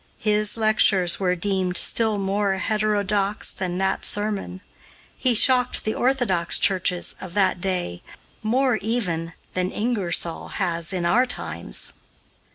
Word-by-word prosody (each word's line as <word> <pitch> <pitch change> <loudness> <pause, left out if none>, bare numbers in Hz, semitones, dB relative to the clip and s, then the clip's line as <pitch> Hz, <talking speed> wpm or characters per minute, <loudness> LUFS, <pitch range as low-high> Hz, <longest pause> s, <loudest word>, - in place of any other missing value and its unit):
His 210 0 0
lectures 210 -5 +3
were 180 -2 +1
deemed 185 0 -1
still 220 -2 +3
more 195 0 0
heterodox 210 0 0
than 180 -2 -4
that 190 0 -1
sermon. 205 -3 -1 0.5
He 250 -3 +1
shocked 250 +1 +4
the 215 - 0
orthodox 245 -10 +2
churches 180 -2 +1
of 185 -1 -8
that 195 -3 +1
day 180 - -2 0.4
more, 245 +2 +1
even, 180 -7 -2 0.2
than 185 0 -1
Ingersoll 195 -7 -2
has 170 -3 -1
in 180 -2 -2
our 245 +9 +3
times. 85 - -3
195 Hz, 125 wpm, -23 LUFS, 180-215 Hz, 0.5 s, shocked